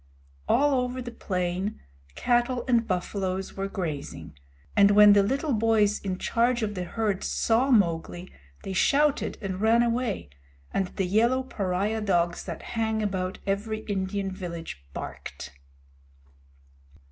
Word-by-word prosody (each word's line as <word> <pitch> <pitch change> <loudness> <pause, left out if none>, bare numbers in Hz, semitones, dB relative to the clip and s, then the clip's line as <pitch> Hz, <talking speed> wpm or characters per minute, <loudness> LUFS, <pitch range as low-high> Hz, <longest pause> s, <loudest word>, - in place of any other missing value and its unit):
All 280 -1 +3
over 250 +1 -3
the 245 -1 -6
plain, 185 -1 -2 0.4
cattle 240 0 +1
and 235 -3 +2
buffaloes 185 +1 -2
were 195 0 -2
grazing, 145 - -5 0.4
and 200 0 +6
when 205 0 +8
the 200 - +6
little 275 +8 0
boys 215 -2 +2
in 190 -2 -3
charge 235 +3 +1
of 210 -1 -1
the 180 -2 -4
herds 210 0 -1
saw 235 +4 +2
Mowgli 175 -5 +1 0.3
they 190 - -4
shouted 285 +8 +2
and 190 0 -3
ran 230 +2 +4
away, 230 - -1 0.4
and 190 - 0
the 190 - -2
yellow 235 +7 +2
pariah 205 -2 -1
dogs 175 -4 0
that 170 -3 -6
hang 220 -1 0
about 185 -2 -2
every 210 +2 -2
Indian 195 -1 -2
village 170 - -7
barked. - - -7
205 Hz, 135 wpm, -27 LUFS, 185-230 Hz, 0.4 s, when